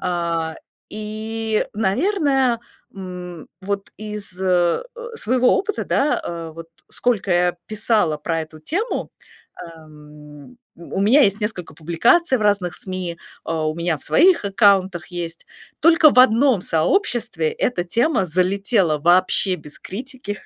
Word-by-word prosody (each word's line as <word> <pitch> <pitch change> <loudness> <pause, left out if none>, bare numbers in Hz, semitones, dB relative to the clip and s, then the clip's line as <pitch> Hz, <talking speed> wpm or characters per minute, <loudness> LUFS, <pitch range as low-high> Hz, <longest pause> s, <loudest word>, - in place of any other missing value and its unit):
А, 170 -3 -2 0.3
и, 215 +1 -3
наверное, 265 - +1 0.3
м, 180 -3 -8
вот 200 +1 -4
из, 210 -3 -5
э, 180 - +2 0.3
своего 255 - +2
опыта, 420 +2 -2
да, 290 +2 +1
э, 165 -1 -5
вот 165 0 -10 0.2
сколько 220 -6 -1
я 175 0 +2
писала 215 -7 +1
про 165 0 -2
эту 155 0 -12
тему, 395 - -3 0.7
эм, 150 - -15 0.2
у 170 +3 -5
меня 230 +9 +5
есть 200 0 +2
несколько 185 -7 -4
публикаций 235 - +2
в - - -7
разных 200 -5 +1
СМИ, 185 -3 -5 0.3
а, 160 -1 -2
у 155 - -3
меня 170 -1 -1
в - - -14
своих 345 - +4
аккаунтах 195 -3 +2
есть. 170 -2 -7 0.3
Только 325 -2 +6
в - - +1
одном 255 -2 +5
сообществе 185 - 0
эта 180 -8 -1
тема 235 - +1
залетела 185 -1 +1
вообще 185 +3 +3
без 150 -2 -13
критики. 230 -1 -7
190 Hz, 130 wpm, -21 LUFS, 170-230 Hz, 0.7 s, Только